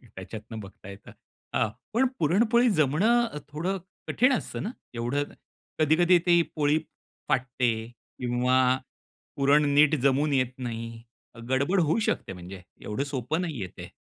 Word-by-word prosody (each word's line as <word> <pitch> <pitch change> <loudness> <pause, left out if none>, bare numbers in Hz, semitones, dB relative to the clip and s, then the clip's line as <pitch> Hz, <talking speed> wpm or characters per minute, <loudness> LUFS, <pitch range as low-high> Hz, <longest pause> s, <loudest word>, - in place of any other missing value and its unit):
त्याच्यातनं 110 +4 -8
बघता 100 -1 -11
येतं. 100 0 -11 0.4
हां. 110 - +2 0.2
पण 255 +3 +3
पुरणपोळी 230 +9 +3
जमणं 195 - +3
अ, 150 - -8
थोडं 175 +6 -2 0.3
कठीण 255 +2 +3
असतं - - -3
ना, 220 - -3 0.2
एवढं 120 +5 -1 0.6
कधी-कधी 170 +4 +5
ती 175 -1 +5
पोळी 150 0 +2 0.5
फाटते 130 -2 +1 0.5
किंवा 125 +1 +1 0.8
पुरण 145 +2 +4
नीट 150 +1 +5
जमून 140 +2 +2
येत 130 -1 +1
नाही. 115 -2 -6 0.3
अ, - - -12
गडबड 140 +9 +2
होऊ 160 +8 +2
शकते. 95 - -2
म्हणजे 90 +1 -9 0.2
एवढं 105 +6 -3
सोपं 135 +7 -1
नाहीये 140 - -4
ते. 90 -1 -8
140 Hz, 135 wpm, -27 LUFS, 120-170 Hz, 0.8 s, कधी-कधी